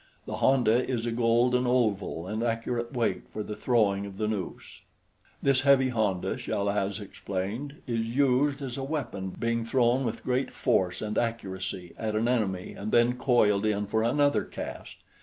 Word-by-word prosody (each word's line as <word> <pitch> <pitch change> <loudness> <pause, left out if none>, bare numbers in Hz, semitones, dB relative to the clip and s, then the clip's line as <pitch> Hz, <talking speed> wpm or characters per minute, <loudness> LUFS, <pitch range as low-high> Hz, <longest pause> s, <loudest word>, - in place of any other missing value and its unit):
The 110 - -4
honda 120 0 +3
is 120 -3 -1
a 120 - -1
golden 120 +2 +2
oval 105 -9 0
and 105 +4 -3
accurate 115 0 -1
weight 120 -4 -1
for 105 - -5
the 105 - -6
throwing 100 -5 +1
of 95 -1 -10
the 110 - -1
noose. 105 -4 -5 0.6
This 135 -1 +3
heavy 135 -1 +5
honda, 105 -7 0
Chal 100 0 -2
az 100 0 -1
explained, 105 +8 -5
is 115 -2 -1
used 140 +3 +2
as 130 0 -4
a - - -3
weapon, 120 -10 -3
being 115 +4 -1
thrown 120 +2 +2
with 115 -2 -3
great 130 +1 0
force 95 -8 0
and 105 0 -1
accuracy 95 -6 -4
at 110 -1 -2
an 110 +2 +1
enemy 100 -7 -1
and 105 +2 -5
then 120 +1 +4
coiled 110 -6 +3
in 105 -1 +1
for 110 +2 0
another 145 +5 +2
cast. - - -7
115 Hz, 170 wpm, -28 LUFS, 105-125 Hz, 0.6 s, heavy